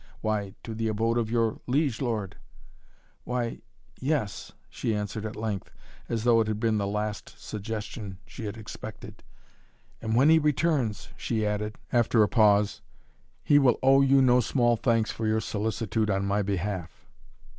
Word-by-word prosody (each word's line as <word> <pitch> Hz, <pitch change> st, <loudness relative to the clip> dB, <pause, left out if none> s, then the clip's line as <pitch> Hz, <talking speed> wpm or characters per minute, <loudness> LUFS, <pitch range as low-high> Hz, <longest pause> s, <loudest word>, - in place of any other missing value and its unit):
"Why 105 Hz, -2 st, -2 dB
to 115 Hz, -, -6 dB
the 115 Hz, 0 st, -2 dB
abode 115 Hz, +2 st, +1 dB
of 110 Hz, -2 st, -1 dB
your 115 Hz, -1 st, +1 dB
liege 135 Hz, -2 st, +1 dB
lord." 110 Hz, -7 st, -2 dB, 0.9 s
"Why 125 Hz, -2 st, -3 dB, 0.4 s
yes 130 Hz, -7 st, -2 dB
" -, -, -36 dB
she 110 Hz, -, -1 dB
answered 105 Hz, +1 st, -3 dB
at 110 Hz, -, -8 dB
length, 105 Hz, -3 st, -3 dB, 0.4 s
as 115 Hz, -2 st, -1 dB
though 115 Hz, -1 st, +5 dB
it 110 Hz, -, -1 dB
had 110 Hz, -1 st, -2 dB
been 110 Hz, -1 st, +1 dB
the 100 Hz, -, -1 dB
last 105 Hz, +1 st, -3 dB
suggestion 105 Hz, -2 st, -6 dB
she 115 Hz, -, -8 dB
had 105 Hz, +2 st, -5 dB
expected. 110 Hz, -2 st, -9 dB, 0.8 s
"And 110 Hz, 0 st, -1 dB
when 135 Hz, +5 st, +5 dB
he 160 Hz, -, +7 dB
returns," 145 Hz, -, 0 dB
she 110 Hz, -3 st, -1 dB
added, 105 Hz, +1 st, -2 dB, 0.2 s
after 120 Hz, -2 st, +4 dB
a -, -, +3 dB
pause, 105 Hz, -2 st, +3 dB, 0.6 s
"he 145 Hz, -, +5 dB
will 130 Hz, -4 st, +4 dB
owe 135 Hz, +1 st, +6 dB
you 135 Hz, 0 st, +5 dB
no 125 Hz, -1 st, +5 dB
small 120 Hz, 0 st, +2 dB
thanks 115 Hz, -1 st, +1 dB
for 110 Hz, -, -3 dB
your 110 Hz, 0 st, +2 dB
solicitude 110 Hz, 0 st, -1 dB
on 95 Hz, -1 st, 0 dB
my 100 Hz, +1 st, +1 dB
behalf." 95 Hz, -3 st, -3 dB
110 Hz, 165 wpm, -27 LUFS, 105-120 Hz, 0.9 s, he